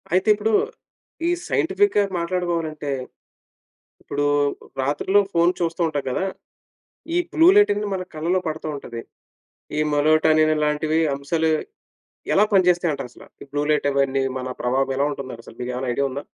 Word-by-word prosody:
అయితే 185 +4 +2
ఇప్పుడు 215 +1 -1 0.7
ఈ - - +3 0.2
సైంటిఫిక్‌గా 385 - +2
మాట్లాడుకోవాలంటే 170 -4 -2 1.1
ఇప్పుడు 145 0 -2 0.6
రాత్రిలో 150 +9 +2
ఫోన్ 170 +1 +4
చూస్తూ 170 0 -2
ఉంటాం 145 -3 -2
కదా! 160 - -1 0.9
ఈ - - +3 0.2
బ్లూ 325 +1 +5
లైటనేది 210 - +4
మన 185 -1 -2
కళ్ళలో 170 +4 0
పడతా 155 0 -4
ఉంటది. 120 -4 -7 0.8
ఈ - - +2
మలటోనిన్ 155 +1 +4
ఇలాంటివి 150 +1 +1 0.2
అంశాలు 160 +4 0 0.8
ఎలా - - +5
పనిచేస్తాయంటారసల? 175 -9 +1 0.2
ఈ - - -8
బ్లూ 145 0 0
లైట్ 150 -1 +2
అవన్నీ 135 -1 +1 0.2
మన 130 0 -5
ప్రభావం 135 +2 0
ఎలా 140 - +2
ఉంటుందసలు? 130 -5 -9
మీకేవైనా 125 +1 -3
ఐడియా 140 +3 0
ఉందా? 140 +2 -5
155 Hz, 130 wpm, -22 LUFS, 140-180 Hz, 1.1 s, బ్లూ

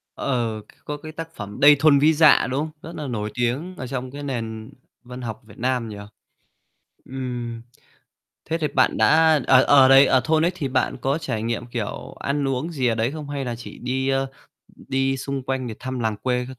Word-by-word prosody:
Ờ, 120 -4 -1 0.4
có 150 - -4
cái 155 +2 -10
tác 165 +1 -8
phẩm 105 -1 -8
"Đây 145 +1 +8
thôn 145 -1 +5
Vĩ 155 +3 +5
Dạ" 155 -1 +5
đúng 130 - -1
hông? 155 +1 -3
Rất 165 - -8
là - - -4
nổi 105 -4 -3
tiếng 130 +10 -2
ở 130 - -6
trong 125 0 -5
cái 145 +2 -8
nền 115 -5 -5 0.3
văn 125 +1 -9
học 110 -3 -6
Việt - - -16
Nam 125 -1 -1
nhỉ. 105 - -7 1.1
Ừm. 125 -3 -5 0.8
Thế 165 +1 -1
thì 155 -2 -1
bạn 140 - +2
đã 160 -1 +5
ờ 130 -1 +6
ờ, 135 -2 +6
đấy 135 +1 +8
ở 130 - +4
thôn 160 0 +2
ấy, - - +2
thì 150 -6 -3
bạn 130 0 0
có 135 +4 0
trải 125 -10 -3
nghiệm, 115 +1 -3
kiểu, 120 -3 -5
ăn 140 0 -1
uống 135 +6 -2
gì 135 -5 -1
ở 115 - +2
đấy 115 +3 -1
không 150 -2 -7
hay 140 -1 -3
là 120 -2 -4
chỉ 115 - -10
đi, 130 +2 -2
ơ, 135 0 +1 0.5
đi 135 0 -1
xung 135 0 -4
quanh 130 0 -3
để 115 - -5
thăm 130 -1 -4
làng 110 -2 -1
quê 125 +1 -1
các 130 -1 -10
130 Hz, 215 wpm, -23 LUFS, 120-145 Hz, 1.1 s, Đây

